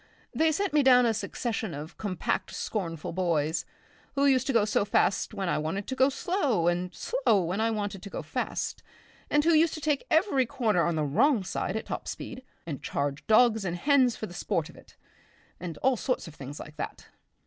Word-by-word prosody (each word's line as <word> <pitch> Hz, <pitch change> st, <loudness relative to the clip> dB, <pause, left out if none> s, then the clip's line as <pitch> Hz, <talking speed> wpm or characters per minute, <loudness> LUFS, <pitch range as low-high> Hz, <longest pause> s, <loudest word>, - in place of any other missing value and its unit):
They 320 Hz, 0 st, +3 dB
sent 390 Hz, +4 st, -1 dB
me 300 Hz, -, +5 dB
down 250 Hz, -2 st, +6 dB
a 230 Hz, -, +3 dB
succession 220 Hz, -, -3 dB
of 150 Hz, +3 st, -8 dB
compact, 195 Hz, -5 st, -2 dB
scornful 165 Hz, -8 st, -3 dB
boys 165 Hz, -3 st, 0 dB, 0.5 s
who 280 Hz, 0 st, +3 dB
used 265 Hz, -2 st, +3 dB
to -, -, +2 dB
go 225 Hz, -3 st, +4 dB
fast 205 Hz, -2 st, +1 dB
when 195 Hz, -2 st, -2 dB
I 170 Hz, -, +1 dB
wanted 165 Hz, +6 st, -3 dB
to 260 Hz, -, -4 dB
go 260 Hz, +1 st, +4 dB
slow, 275 Hz, -, 0 dB
and 175 Hz, +1 st, 0 dB
slow 210 Hz, -, +1 dB
when 180 Hz, +5 st, -1 dB
I 225 Hz, -, +2 dB
wanted 205 Hz, -3 st, -3 dB
to 200 Hz, -, -8 dB
go -, -, -5 dB
fast, -, -, -3 dB, 0.5 s
and 295 Hz, 0 st, +3 dB
who 335 Hz, +1 st, +4 dB
used 320 Hz, +1 st, +4 dB
to -, -, -6 dB
take 295 Hz, -2 st, -1 dB
every 315 Hz, -, +3 dB
corner 225 Hz, -10 st, +1 dB
on 170 Hz, -, 0 dB
the 155 Hz, -, 0 dB
wrong 220 Hz, -, +3 dB
side 185 Hz, +1 st, -3 dB
at 220 Hz, -, -3 dB
top -, -, -5 dB
speed, 255 Hz, -, -6 dB, 0.2 s
and 150 Hz, -5 st, -5 dB
charge 140 Hz, 0 st, -3 dB
dogs 220 Hz, -1 st, +5 dB
and 175 Hz, -2 st, -2 dB
hens 260 Hz, +1 st, +3 dB
for -, -, -5 dB
the 175 Hz, -, -10 dB
sport 165 Hz, -2 st, -2 dB
of -, -, -14 dB
it, -, -, -17 dB, 0.6 s
and 170 Hz, -3 st, -6 dB
all 265 Hz, -1 st, +3 dB
sorts 255 Hz, -4 st, -2 dB
of 165 Hz, -, -10 dB
things 140 Hz, 0 st, -8 dB
like 150 Hz, 0 st, -10 dB
that. -, -, -6 dB
215 Hz, 205 wpm, -28 LUFS, 175-265 Hz, 0.6 s, down